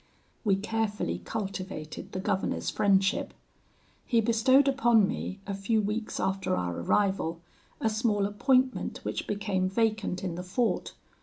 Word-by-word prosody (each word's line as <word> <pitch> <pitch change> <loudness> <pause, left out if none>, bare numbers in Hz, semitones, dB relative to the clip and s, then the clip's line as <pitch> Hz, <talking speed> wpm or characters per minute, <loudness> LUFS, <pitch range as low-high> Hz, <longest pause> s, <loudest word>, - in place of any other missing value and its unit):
"We 200 -4 +3
carefully 210 - -2
cultivated 185 - -5
the 185 - -4
governor's 190 0 -1
friendship. 195 0 +2 0.7
He 235 - +3
bestowed 240 +5 +4
upon 240 -6 +4
me, 190 - -4
a 200 - -3
few 195 +3 +1
weeks 215 +2 -2
after 190 - 0
our 90 -1 -2
arrival, 170 - +1 0.4
a - - +1
small 215 -2 +1
appointment 255 +5 +1
which - - -3
became 200 -3 0
vacant 215 -3 0
in 180 -3 -2
the 175 - -5
fort. 225 +6 -1
205 Hz, 135 wpm, -29 LUFS, 190-225 Hz, 0.7 s, bestowed